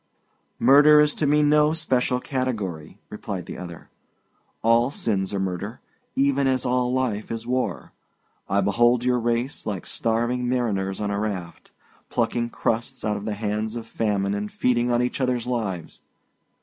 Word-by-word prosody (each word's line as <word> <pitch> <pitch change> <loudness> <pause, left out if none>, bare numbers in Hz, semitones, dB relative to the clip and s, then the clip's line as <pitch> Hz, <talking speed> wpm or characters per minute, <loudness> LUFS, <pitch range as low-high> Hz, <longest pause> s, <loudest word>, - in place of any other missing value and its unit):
"Murder 150 +2 +7
is 150 0 +4
to 150 - 0
me 150 +1 +4
no 150 +1 +4
special 130 -5 +1
category," 105 - -4
replied 100 -4 -5
the - - -7
other. 85 -3 -9 0.7
"All 115 +2 +4
sins 100 -8 0
are 100 - -2
murder, 95 +4 -3 0.4
even 140 0 +2
as 130 -1 +1
all 125 0 +1
life 125 -5 -1
is 115 0 -4
war. 125 +1 -2 0.6
I 100 +1 +2
behold 120 +5 +3
your 125 -1 +2
race, 120 +3 -1
like 100 -4 -3
starving 120 +2 0
mariners 100 -6 -1
on 105 -1 -2
a 100 - -1
raft, 95 -5 -5 0.4
plucking 120 -1 0
crusts 115 0 -2
out 105 0 0
of 100 0 -6
the 110 -1 -2
hands 105 +1 -2
of 115 -1 -5
famine 100 -3 -1
and 105 +1 -3
feeding 120 -1 +1
on 120 0 +2
each 125 +2 -2
other's 125 -2 0
lives. 105 -9 -3
115 Hz, 160 wpm, -24 LUFS, 105-125 Hz, 0.7 s, Murder